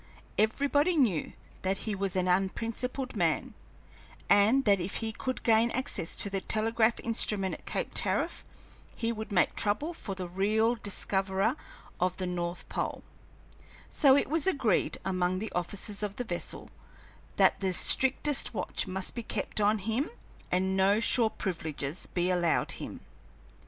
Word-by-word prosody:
Everybody 285 - +2
knew 215 - +1 0.3
that 190 +1 0
he 215 - -1
was 195 -1 -2
an 185 -1 +1
unprincipled 230 +8 -1
man, - - 0 0.8
and 220 +7 +5
that 200 -2 +4
if 180 +2 -4
he 225 -1 -2
could 255 +3 -4
gain 225 0 +4
access 250 -9 -2
to - - +3
the 195 -1 -2
telegraph 220 +2 +1
instrument 210 -4 +2
at - - -10
Cape - - -2
Tariff - - 0 0.5
he 230 0 -1
would 220 -1 -6
make 180 -3 +2
trouble 230 +11 0
for 200 - -6
the 185 -1 -5
real 215 +6 +1
discoverer 195 0 0 0.4
of 180 0 0
the 185 - -2
north 175 -1 -3
pole; - - -3 0.9
so 275 -3 +5
it - - +1
was 320 +1 0
agreed 265 - +1
among 185 -1 0
the 215 +3 -4
officers 200 +4 -2
of 205 -1 -3
the 245 - -3
vessel 175 -7 -4 0.6
that - - +4
the 190 -1 0
strictest 265 +8 +3
watch - - -1
must 190 0 -2
be 235 - -4
kept 215 - -3
on 210 +1 +3
him 225 - -1 0.4
and 190 +1 +1
no 195 +2 +3
shore 230 0 +3
privileges 160 -6 -4
be 180 +1 0
allowed 175 -2 +1
him. - - -7
205 Hz, 150 wpm, -29 LUFS, 185-230 Hz, 0.9 s, and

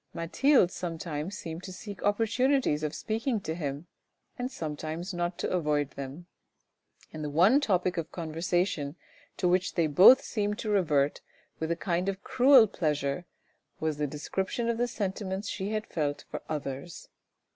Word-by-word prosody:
Mathilde 185 - +3
sometimes 165 +1 -4
seemed 165 0 -6
to 185 - -8
seek 200 0 -8
opportunities 225 - +2
of 155 -1 -2
speaking 225 +1 -1
to 160 - -3
him 145 -2 -4 0.5
and 250 +1 -4
sometimes 160 - -5
not 175 0 -2
to - - -2
avoid 150 -5 0
them; 140 +5 -7 0.9
and 155 - -5
the 150 - -2
one 190 - +5
topic 185 -7 +1
of 165 -1 -3
conversation 165 -2 -1 0.4
to 180 - +1
which 180 +1 +1
they 170 - +3
both 185 - +8
seemed 210 -2 -2
to 215 - -3
revert 150 -8 +2 0.4
with 160 - -2
a 170 - +1
kind 180 +1 -1
of 195 0 -5
cruel 260 -2 +6
pleasure, 150 -4 -2 0.5
was 155 -2 -1
the 150 0 0
description 190 - -2
of 235 0 -1
the 245 - +2
sentiments 195 -2 -3
she 195 0 -3
had 215 0 -2
felt 145 -3 -2
for - - -4
others. 145 +1 -5
175 Hz, 155 wpm, -29 LUFS, 155-205 Hz, 0.9 s, both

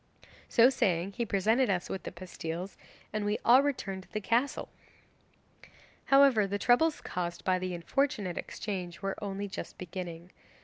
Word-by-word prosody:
So 240 +3 +6
saying 185 -7 +1
he 235 +3 -3
presented 220 +6 +2
us 185 -2 0
with 190 - -4
the - - -6
pastilles, 180 0 -6 0.4
and 215 -1 -1
we 205 +1 0
all 250 +3 +8
returned 210 -9 -2
to - - -20
the 215 - -2
castle. 235 +6 0 1.4
'However, 275 -7 +5
the 200 +1 -1
troubles 300 +9 +3
caused 175 -1 -4
by 185 -1 +2
the 185 -1 -3
unfortunate 195 0 -1
exchange 185 -3 -5
were 195 0 0
only 200 0 -3
just 195 - -7
beginning. 175 -1 -7
195 Hz, 150 wpm, -30 LUFS, 180-235 Hz, 1.4 s, all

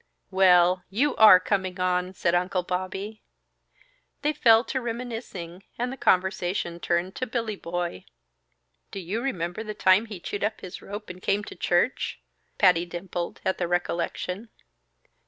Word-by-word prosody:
"Well! 180 -1 +5
You 260 +9 +1
are 210 -4 +9
coming 185 -1 -1
on!" 180 0 0
said 170 -1 +1
Uncle 180 +1 +1
Bobby. 190 +4 -4 1.0
They 300 +1 +2
fell 230 -5 +5
to 260 0 -3
reminiscing, 225 -7 -6
and 245 +2 -2
the - - -5
conversation 185 -4 0
turned 175 +3 -1
to 255 - -2
Billy 230 -2 -2
Boy. 175 - -4 0.8
"Do 195 - -6
you 195 +6 -3
remember 180 -6 -3
the 215 -1 -6
time 190 +3 +4
he 205 -4 -7
chewed 200 +4 -4
up 215 +1 -1
his 185 +1 -8
rope 205 0 -7
and 180 0 -12
came 200 +2 0
to - - -9
church?" 175 +9 0 0.4
Patty 180 -4 +5
dimpled 175 0 -5
at 190 - 0
the 175 - 0
recollection. 175 +4 -2
190 Hz, 150 wpm, -26 LUFS, 180-220 Hz, 1.0 s, are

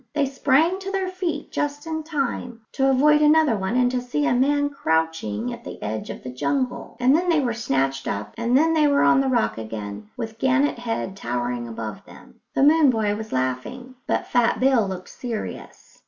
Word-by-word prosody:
They 290 -2 +2
sprang 280 +6 +2
to 390 0 -6
their 385 -1 -1
feet 355 -5 -4
just 290 +1 -2
in 320 -1 -3
time 275 -6 -3
to 270 0 +1
avoid 300 +3 +4
another 300 -4 +5
one 190 +3 -2
and 250 -1 +3
to 250 -1 -1
see 250 +4 -1
a 245 - +2
man 285 +3 +2
crouching 160 - -1
at - - -10
the - - -8
edge 110 +1 -4
of - - -7
the 125 - -6
jungle; 255 - -2
and 255 +3 +4
then 355 +2 +1
they 330 -3 +4
were 250 -4 0
snatched 135 - -1
up, 100 +1 -4
and 235 +2 +2
there 325 +3 +3
they 305 -2 +4
were 285 0 +3
on 260 - +5
the 270 - 0
rock 105 - +1
again, 105 -2 -7
with 225 0 -6
Gannet 265 +1 +2
Head 225 -5 -3
towering 120 -5 -3
above 110 -2 -6
them. - - -16 0.2
The - - +3
moon 300 0 +6
boy 215 -4 +1
was 220 +1 -7
laughing, 130 - -3
but - - 0
Fat 240 -1 +2
Bill 255 -5 +3
looked 185 -1 -6
serious. 235 -4 -7
245 Hz, 200 wpm, -23 LUFS, -, 0.2 s, moon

